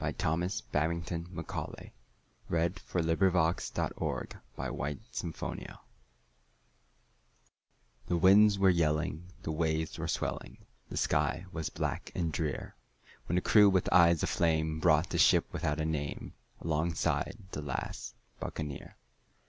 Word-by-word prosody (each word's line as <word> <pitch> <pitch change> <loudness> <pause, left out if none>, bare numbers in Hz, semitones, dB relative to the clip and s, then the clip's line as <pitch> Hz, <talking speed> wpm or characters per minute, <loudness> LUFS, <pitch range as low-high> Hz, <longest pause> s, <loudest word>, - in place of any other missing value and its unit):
Thomas 90 +6 0
Babbington 85 +2 -2
Macaulay 85 -2 -6 0.6
The 85 +1 +2
Last 90 -1 +1 1.6
Buccaneer - - -6 2.3
THE 90 - +1
winds 100 +3 +6
were 95 -1 +5
yelling, 80 0 0 0.2
the 80 - -2
waves 80 0 -1
were - - -2
swelling, - - -3 0.3
The - - -5
sky - - +1
was 80 -4 -3
black - - -3
and 85 -3 -1
drear, 75 -7 -3 0.5
When 90 - 0
the 90 - +3
crew 105 +1 +6
with 95 -2 +1
eyes 85 -2 +6
of - - +1
flame 80 -1 +1
brought 80 +1 +3
the - - 0
ship - - +6
without 75 +1 -1
a 80 - 0
name 75 -2 -3 0.3
Alongside 80 +5 0
the 75 - -4
last 70 -4 -5 0.2
Buccaneer. 75 -4 -6
80 Hz, 115 wpm, -31 LUFS, 80-90 Hz, 2.3 s, winds